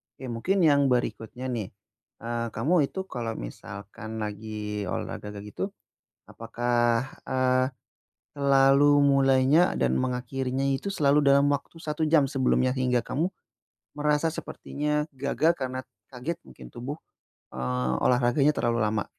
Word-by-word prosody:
Oke, 130 -3 -7
mungkin 180 +11 +1
yang 140 -3 +5
berikutnya 125 +1 -2
nih, 110 -6 -3 0.6
eee, 115 0 -2
kamu 145 +5 +2
itu 190 - -7
kalau 120 -10 -4
misalkan 105 - -7
lagi 105 -1 -5
olahraga 105 +3 -5
kayak 100 - -7
gitu, - - -4 0.6
apakah, 120 +1 0 0.2
eee, 130 0 +2 0.7
selalu 140 +1 +5
mulainya 140 +4 +4
dan - - +2
mengakhirinya 130 +1 -1
itu 140 +9 -1
selalu 145 -3 +3
dalam 140 +1 +5
waktu 145 +3 -3
1 155 0 -2
jam 150 -3 +4
sebelumnya 130 -1 +1
hingga 125 -1 +2
kamu 160 - -2 0.7
merasa 150 +2 +2
sepertinya 150 -1 -3
gagal 140 +5 +1
karena 130 -1 -3 0.3
kaget 140 +7 -4
mungkin 65 -1 -12
tubuh, 135 +5 -5 0.6
eee, 65 0 -1
olahraganya 125 +4 +3
terlalu 120 0 +1
lama? 105 -1 0
130 Hz, 125 wpm, -27 LUFS, 115-145 Hz, 0.7 s, yang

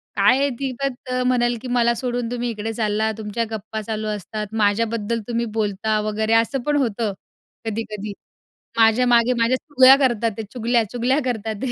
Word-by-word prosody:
काय 205 +6 +4
आहे 280 0 +2
ती 270 -1 -2
तत 260 -1 -4 0.2
म्हणल 240 -1 +2
की 260 - -7
"मला 240 -1 +2
सोडून 245 -1 -3
तुम्ही 245 0 -2
इकडे 225 0 -4
चाललात, 220 0 0
तुमच्या 220 +1 -3
गप्पा 220 0 -5
चालू 215 0 -4
असतात, 210 +1 -4
माझ्याबद्दल 225 +2 +1
तुम्ही 235 0 -1
बोलता 210 +1 0
वगैरे." 220 +1 0
असं 230 +4 +2
पण 295 - +2
होतं 230 -5 0 0.5
कधी-कधी 215 -2 -4 0.7
"माझ्या 225 +2 +5
मागे 240 0 +4
माझ्या 235 +3 +3
चुग्याल्या 270 -1 +6
करतातते 225 -2 -2
चुगल्या-चुगल्या 240 +2 +1
करतातते." 225 0 -2
230 Hz, 155 wpm, -22 LUFS, 215-245 Hz, 0.7 s, चुग्याल्या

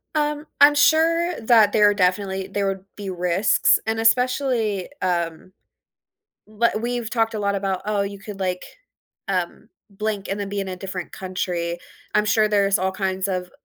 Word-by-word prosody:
Um, 300 0 -1 0.2
I'm 290 +1 +8
sure 330 +3 +3
that 220 -3 +5
there 210 -1 +5
are - - +2
definitely 190 0 0
there 200 0 -2
would 195 -1 -4
be 200 -2 -6
risks, 180 +2 +2
and 220 0 0
especially, 230 -4 +1
um, 170 0 -2 0.9
w 215 +2 +1
we've 240 -1 -3
talked 225 -1 0
a - - -2
lot 200 -1 0
about, 195 -1 -2
"Oh, 210 -1 0
you 200 0 -5
could, 200 0 -9
like, 180 -1 -2 0.6
um, 185 +3 -3 0.2
blink, 205 0 -3
and 195 +1 -3
then 200 - -3
be 200 0 -3
in 195 - -4
a 185 - -5
different 185 -1 -6
country," 175 -2 -3 0.4
I'm 210 - +3
sure 215 +1 +3
there's 200 -1 +2
all 190 +1 -1
kinds 190 0 -2
of 180 -1 -3
200 Hz, 170 wpm, -22 LUFS, 190-225 Hz, 0.9 s, I'm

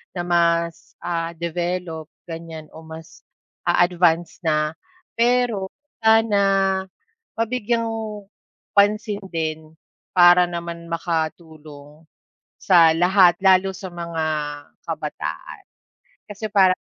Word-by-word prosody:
na 175 - -2
mas 170 -1 0
ah, 170 -1 -2
develop 170 -1 -4 0.2
ganyan 165 -2 -8
o 160 - -12
mas 160 0 -12 0.4
a-advance 175 -1 +2
na. 155 -1 +1 0.5
Pero 235 -5 +2 0.3
sana 225 -1 +4 1.0
mabigyang 230 0 -1 0.9
pansin 205 0 +2
din 160 -2 -4 0.4
para 175 0 +7
naman 170 -1 -6
makatulong 160 -2 -5 0.5
sa 170 -4 +6
lahat 180 +1 +4
lalo 190 0 +4
sa 190 0 -8
mga 170 -2 -4 0.6
kabataan. 150 - -6 0.7
Kasi 210 +1 -6
para 190 -3 +5
170 Hz, 90 wpm, -22 LUFS, 160-190 Hz, 1.0 s, para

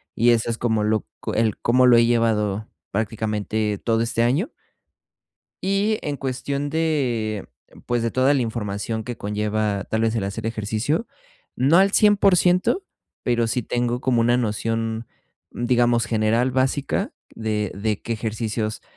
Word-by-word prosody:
y 120 +2 +3
eso 115 0 +1
es 115 - -2
como 110 -3 0
lo 110 0 +1
co - - -4
el 110 -2 +1
cómo 125 +2 +3
lo 120 - +7
he 115 - +5
llevado, 110 -3 +1 0.2
prácticamente 105 0 -1
todo 115 -1 +1
este 115 0 0
año. 140 - +1 1.1
Y 200 +3 +1
en 145 - -3
cuestión 140 +2 -3
de, 130 -10 -1 0.4
pues, 120 -1 0
de 115 0 -1
toda 130 +2 +3
la 140 - +2
información 110 -1 -3
que 120 0 -6
conlleva, 105 0 -1
tal 110 - 0
vez, 115 0 +1
el 110 - -1
hacer 100 +3 -4
ejercicio, 115 - -1 0.5
no 140 +6 +4
al 195 +1 +5
100% 195 - +4 0.4
pero 120 -1 +1
sí 125 +2 0
tengo 120 +1 -1
como 125 -3 +2
una 120 +1 +3
noción, 115 0 -2 0.5
digamos, 120 -1 +2
general 115 +3 +1
básica 130 +2 0 0.2
de 105 -3 -2
de 105 +1 -2
qué 115 - -3
ejercicios 110 -1 -3
115 Hz, 150 wpm, -23 LUFS, 110-130 Hz, 1.1 s, lo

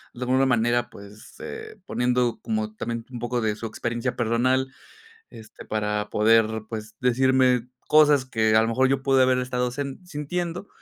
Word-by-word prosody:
de 125 - -11
alguna 130 +2 +2
manera 120 0 +1
pues, 100 0 -14
eh, 440 -1 -8
poniendo 125 -3 0
como 220 -1 -2
también 115 - -4
un 120 - -6
poco 120 0 -2
de 110 -1 0
su 115 +1 -6
experiencia 120 +3 -3
personal, 130 +3 +1 0.6
este, 110 -1 -13
para 105 -1 -2
poder 110 +1 +3
pues 110 -1 -7
decirme 125 -1 +2 0.2
cosas 150 -3 +5
que 110 -4 +1
a 110 - +6
lo 115 - 0
mejor 130 +3 +2
yo 135 0 0
pude 135 -1 +3
haber 130 0 +3
estado 125 0 -1
hacie 135 +2 -5
sintiendo, 175 +4 -4
125 Hz, 165 wpm, -24 LUFS, 115-130 Hz, 0.6 s, a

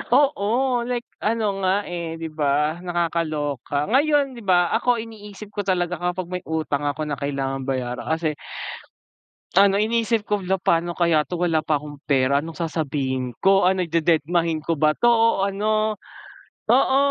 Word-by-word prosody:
Oo, 255 -2 +2
like 245 -1 -2 0.2
ano 215 -3 0
nga, 195 +2 +1
eh, 170 -3 -5
'di 165 -1 -6
ba 150 +1 0
nakakaloka. 155 -6 -2
Ngayon, 285 +1 +3
'di 245 - -10
ba 180 -4 +2
ako 245 +1 +2
iniisip 210 -2 -11
ko 205 -2 -4
talaga 180 -2 0
kapag 180 0 -3
may 180 0 -4
utang 150 -3 -1
ako 145 +2 -2
na 145 -3 -4
kailangang 135 -1 -3
bayaran 125 -2 -3
kasi 160 -2 -1 1.2
ano, 195 0 +6
iniisip 225 +1 +1
ko, 210 -1 -1
hala, 190 0 0
pa'no 170 -1 0
kaya 165 -3 +2
'to, 180 - -3
wala 170 -2 +1
pa 155 -1 0
akong 145 0 -8
pera, 140 0 +3
anong 160 +2 -8
sasabihin 135 -7 -2
ko. 195 -1 +5
Ano, 185 -1 +1
dededmahin 165 0 +1
ko 165 -4 -1
ba 155 0 +3
'to, 240 - +3
o 230 -3 +3
ano. 215 +2 0 0.7
Oo, 265 - +4
175 Hz, 160 wpm, -23 LUFS, 155-205 Hz, 1.2 s, ano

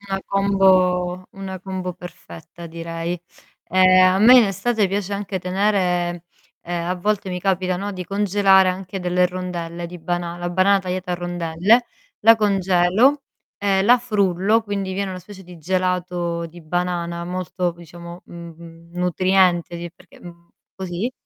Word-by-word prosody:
Una 195 -1 -4
combo 185 -2 +2
una 190 -2 -7
combo 185 -1 -5
perfetta 170 - -12
direi. 165 +1 -5 0.5
Ehm, 185 0 +5
a 185 +1 +4
me 245 +5 +8
in 235 - +6
estate 205 +1 0
piace 200 0 -3
anche 200 -1 -3
tenere 180 -2 0 0.4
ehm, 170 0 -4
a 180 - 0
volte 200 +1 -1
mi 180 - -3
capita, 185 -1 0
no, 200 +2 -4
di 185 -2 -6
congelare 195 -1 +3
anche 185 +1 -4
delle 180 0 +2
rondelle 175 -2 -5
di 180 +1 -10
banana, 175 +1 -3
la 175 0 -3
banana 195 +2 +3
tagliata 185 0 -4
a - - +1
rondelle, 175 +6 +1 0.4
la 225 +2 +7
congelo 200 +6 +2 0.3
e 195 -1 +1
la 240 +5 +6
frullo, 210 -2 +1
quindi 200 -3 -4
viene 195 0 -3
una 185 -1 -7
specie 190 +1 -13
di 180 0 -12
gelato 180 -1 -2
di 170 +1 -13
banana, 170 +1 -3
molto 180 0 -3
diciamo, 170 +1 -12
mhmm, 170 -1 -12
nutriente 180 -1 +2
di 170 0 -6
perché, 180 -1 -20
mhmm, 170 -1 -14 0.3
così, 190 +5 -4
180 Hz, 150 wpm, -21 LUFS, 175-195 Hz, 0.5 s, me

